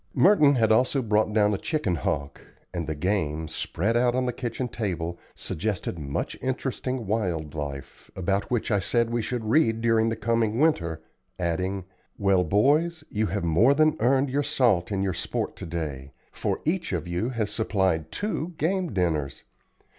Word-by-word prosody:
Merton 155 Hz, -8 st, +6 dB
had 110 Hz, -3 st, +3 dB
also 130 Hz, +4 st, +3 dB
brought 105 Hz, -1 st, +2 dB
down 105 Hz, -1 st, +3 dB
a 100 Hz, -, -2 dB
chicken 150 Hz, -, -1 dB
hawk; 70 Hz, -2 st, -2 dB, 0.3 s
and 85 Hz, -3 st, -3 dB
the 80 Hz, -, -2 dB
game, 80 Hz, -3 st, -1 dB
spread 100 Hz, +8 st, -1 dB
out 120 Hz, 0 st, +3 dB
on 130 Hz, 0 st, +1 dB
the 125 Hz, -, -1 dB
kitchen 125 Hz, +1 st, -3 dB
table, 85 Hz, -7 st, -3 dB, 0.2 s
suggested 90 Hz, -2 st, -3 dB
much 70 Hz, -2 st, -3 dB
interesting 130 Hz, -1 st, -2 dB
wild 90 Hz, -8 st, -1 dB
life, 70 Hz, -3 st, -7 dB
about 95 Hz, +2 st, -1 dB
which 120 Hz, -1 st, -1 dB
I 100 Hz, -, +3 dB
said 115 Hz, +5 st, +1 dB
we 120 Hz, 0 st, 0 dB
should 115 Hz, +1 st, -3 dB
read 115 Hz, -2 st, +3 dB
during 115 Hz, -1 st, +3 dB
the 115 Hz, -, -1 dB
coming 115 Hz, -1 st, 0 dB
winter, 85 Hz, -, +1 dB, 0.3 s
adding: 90 Hz, +2 st, -2 dB, 0.3 s
"Well, 100 Hz, -3 st, +3 dB
boys, 150 Hz, -, +2 dB
you 110 Hz, 0 st, 0 dB
have 100 Hz, -1 st, -2 dB
more 100 Hz, -, +4 dB
than 155 Hz, +1 st, +4 dB
earned 130 Hz, +3 st, +2 dB
your 145 Hz, +2 st, +1 dB
salt 120 Hz, -, +2 dB
in 95 Hz, -1 st, 0 dB
your 95 Hz, -2 st, 0 dB
sport -, -, -3 dB
to -, -, -7 dB
day, 70 Hz, -5 st, -5 dB, 0.2 s
for -, -, -2 dB
each 170 Hz, -, -1 dB
of 85 Hz, -1 st, -2 dB
you 90 Hz, +7 st, -1 dB
has 110 Hz, -5 st, -2 dB
supplied 95 Hz, -7 st, 0 dB
two 180 Hz, -5 st, -3 dB
game 180 Hz, +2 st, 0 dB
dinners. 80 Hz, -7 st, -1 dB
105 Hz, 170 wpm, -26 LUFS, 85-125 Hz, 0.3 s, Merton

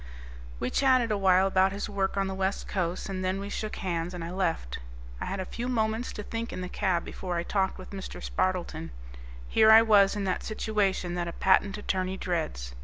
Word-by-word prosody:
We 125 Hz, -, -2 dB
chatted 255 Hz, -4 st, +3 dB
a 210 Hz, -, +2 dB
while 190 Hz, -1 st, +5 dB
about 190 Hz, 0 st, +3 dB
his 200 Hz, +1 st, -4 dB
work 200 Hz, -2 st, -1 dB
on 195 Hz, -, +2 dB
the 190 Hz, -, -3 dB
West 190 Hz, +1 st, -2 dB
Coast, 180 Hz, -2 st, -2 dB
and 190 Hz, -1 st, -4 dB
then 185 Hz, +1 st, 0 dB
we 200 Hz, +1 st, -5 dB
shook 215 Hz, -1 st, -3 dB
hands 175 Hz, -2 st, -3 dB
and 175 Hz, -, -5 dB
I 170 Hz, -, -5 dB
left. 170 Hz, -, -2 dB, 0.4 s
I -, -, -3 dB
had 195 Hz, -, -3 dB
a 185 Hz, -, -2 dB
few 240 Hz, +5 st, -5 dB
moments 225 Hz, -1 st, 0 dB
to 210 Hz, -, -6 dB
think 230 Hz, +2 st, -4 dB
in 185 Hz, -, -5 dB
the 180 Hz, -, -4 dB
cab 185 Hz, -4 st, 0 dB
before 180 Hz, -2 st, -4 dB
I 170 Hz, -, -1 dB
talked 190 Hz, +1 st, 0 dB
with 185 Hz, -, -10 dB
Mr. 195 Hz, -2 st, -7 dB
Spardleton. 175 Hz, -3 st, -2 dB, 0.6 s
Here 220 Hz, -, +5 dB
I 220 Hz, +1 st, +9 dB
was 205 Hz, -3 st, +5 dB
in 205 Hz, -, -2 dB
that 185 Hz, -2 st, -1 dB
situation 205 Hz, -5 st, -1 dB
that 175 Hz, -1 st, -2 dB
a -, -, -3 dB
patent 195 Hz, +1 st, +3 dB
attorney 190 Hz, -2 st, -2 dB
dreads. 155 Hz, -, -3 dB
190 Hz, 215 wpm, -28 LUFS, 180-210 Hz, 0.6 s, I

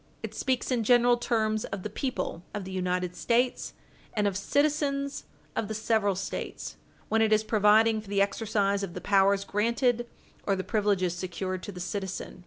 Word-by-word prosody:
It -, -, -5 dB
speaks 260 Hz, -1 st, -1 dB
in 240 Hz, -3 st, +1 dB
general 245 Hz, +1 st, +5 dB
terms 220 Hz, -3 st, 0 dB
of 195 Hz, -2 st, -6 dB
the 215 Hz, -, -3 dB
people 255 Hz, -, -3 dB
of 205 Hz, -, -3 dB
the 190 Hz, -, -7 dB
United 180 Hz, -1 st, -1 dB
States, 245 Hz, +1 st, 0 dB, 0.4 s
and 210 Hz, -1 st, +1 dB
of 200 Hz, -2 st, +1 dB
citizens 280 Hz, +4 st, 0 dB, 0.3 s
of 215 Hz, -, -1 dB
the 220 Hz, -, -4 dB
several 215 Hz, -2 st, +1 dB
States, 195 Hz, -, -5 dB, 0.3 s
when 225 Hz, 0 st, +2 dB
it 220 Hz, -1 st, +3 dB
is 215 Hz, 0 st, +4 dB
providing 215 Hz, +1 st, +4 dB
for 210 Hz, -, -16 dB
the 200 Hz, -1 st, +1 dB
exercise 200 Hz, 0 st, +1 dB
of 190 Hz, -3 st, -5 dB
the -, -, -3 dB
powers 200 Hz, 0 st, +3 dB
granted 235 Hz, +4 st, +1 dB, 0.4 s
or 200 Hz, -, +3 dB
the 190 Hz, -, -3 dB
privileges 200 Hz, -5 st, +1 dB
secured 185 Hz, +1 st, -4 dB
to 205 Hz, -, -6 dB
the 180 Hz, -, -9 dB
citizen. 190 Hz, 0 st, -4 dB
210 Hz, 180 wpm, -28 LUFS, 195-235 Hz, 0.4 s, general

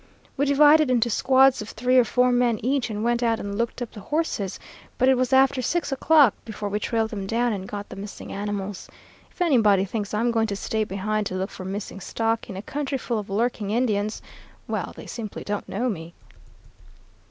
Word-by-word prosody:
We 285 Hz, +1 st, +1 dB
divided 295 Hz, +1 st, +6 dB
into 240 Hz, -2 st, +2 dB
squads 265 Hz, +2 st, +4 dB
of 210 Hz, -, -7 dB
three 250 Hz, +3 st, 0 dB
or 250 Hz, -, +7 dB
four 250 Hz, +2 st, +2 dB
men 245 Hz, -2 st, +2 dB
each 270 Hz, -1 st, +1 dB
and 210 Hz, 0 st, -3 dB
went 240 Hz, +1 st, +1 dB
out 230 Hz, -2 st, +1 dB
and 200 Hz, 0 st, -4 dB
looked 235 Hz, +3 st, -2 dB
up 235 Hz, -, -8 dB
the 215 Hz, -, -10 dB
horses, 220 Hz, -, -2 dB, 0.4 s
but 255 Hz, -, +3 dB
it 265 Hz, -, +6 dB
was 255 Hz, 0 st, 0 dB
after 265 Hz, 0 st, +4 dB
six 330 Hz, +5 st, -1 dB
o'clock 280 Hz, -3 st, +5 dB
before 210 Hz, -2 st, -5 dB
we 205 Hz, +1 st, -1 dB
trailed 225 Hz, 0 st, -1 dB
them 200 Hz, -3 st, -4 dB
down 235 Hz, +2 st, +1 dB
and 190 Hz, -2 st, -5 dB
got 205 Hz, 0 st, -5 dB
the -, -, -8 dB
missing 200 Hz, +1 st, -8 dB
animals. 200 Hz, -1 st, -4 dB, 0.4 s
If -, -, -13 dB
anybody 215 Hz, -, +4 dB
thinks 205 Hz, +1 st, -4 dB
I'm 230 Hz, +3 st, +1 dB
going 225 Hz, -1 st, +1 dB
to 200 Hz, -, -3 dB
stay 220 Hz, +2 st, -1 dB
behind 205 Hz, +2 st, -2 dB
to 185 Hz, -, -5 dB
look 190 Hz, +2 st, -3 dB
for 185 Hz, -, -8 dB
missing 195 Hz, +1 st, -5 dB
stock 225 Hz, +4 st, -2 dB
in 190 Hz, -, -6 dB
a 195 Hz, -, -6 dB
country 280 Hz, +1 st, -3 dB
full 235 Hz, -3 st, -2 dB
of 205 Hz, -, -8 dB
lurking 215 Hz, 0 st, -1 dB
Indians 215 Hz, -2 st, 0 dB, 0.4 s
well, -, -, -3 dB
they -, -, -10 dB
simply 220 Hz, -4 st, -6 dB
don't 205 Hz, 0 st, -4 dB
know 235 Hz, +6 st, -1 dB
me.' 170 Hz, -7 st, -5 dB
225 Hz, 210 wpm, -24 LUFS, 205-255 Hz, 0.4 s, or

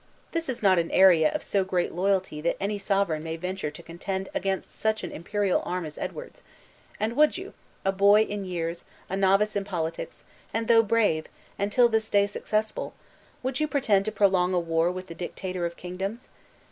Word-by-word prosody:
This 330 Hz, -3 st, -2 dB
is 245 Hz, -4 st, -4 dB
not 190 Hz, -3 st, +5 dB
an 165 Hz, -, -1 dB
area 175 Hz, -5 st, +6 dB
of -, -, -3 dB
so 200 Hz, -1 st, +1 dB
great 185 Hz, -2 st, -1 dB
loyalty 190 Hz, -4 st, 0 dB
that 170 Hz, -, 0 dB
any 205 Hz, +1 st, -2 dB
sovereign 195 Hz, -5 st, 0 dB
may 160 Hz, +1 st, -4 dB
venture 180 Hz, -1 st, -3 dB
to 150 Hz, -, -12 dB
contend 190 Hz, +3 st, -4 dB
against 190 Hz, 0 st, -2 dB
such 220 Hz, 0 st, -1 dB
an -, -, -4 dB
imperial 200 Hz, +3 st, 0 dB
arm 180 Hz, -1 st, -3 dB
as 155 Hz, -, -8 dB
Edward's. -, -, -6 dB, 0.6 s
And 220 Hz, +2 st, -1 dB
would 305 Hz, +5 st, +4 dB
you 380 Hz, +3 st, -8 dB, 0.3 s
a 195 Hz, -, +3 dB
boy 200 Hz, +2 st, +5 dB
in 205 Hz, -2 st, -4 dB
years, 170 Hz, -2 st, -3 dB, 0.3 s
a -, -, 0 dB
novice 195 Hz, +2 st, +3 dB
in 200 Hz, -, 0 dB
politics, 165 Hz, -4 st, -4 dB, 0.3 s
and 225 Hz, 0 st, -1 dB
though 230 Hz, -1 st, +7 dB
brave, 205 Hz, -8 st, +1 dB, 0.3 s
and 200 Hz, +1 st, 0 dB
till 245 Hz, +2 st, +5 dB
this 220 Hz, -1 st, 0 dB
day 200 Hz, -1 st, +4 dB
successful 215 Hz, +1 st, -2 dB, 0.5 s
would 260 Hz, +1 st, -2 dB
you 305 Hz, -, +1 dB
pretend 220 Hz, -10 st, +2 dB
to 215 Hz, -, -1 dB
prolong 185 Hz, -3 st, +3 dB
a -, -, +3 dB
war 165 Hz, 0 st, +1 dB
with 185 Hz, 0 st, -6 dB
the 170 Hz, -, -9 dB
dictator 180 Hz, 0 st, -4 dB
of 170 Hz, -, -10 dB
kingdoms? 195 Hz, +7 st, -5 dB
195 Hz, 195 wpm, -27 LUFS, 175-215 Hz, 0.6 s, though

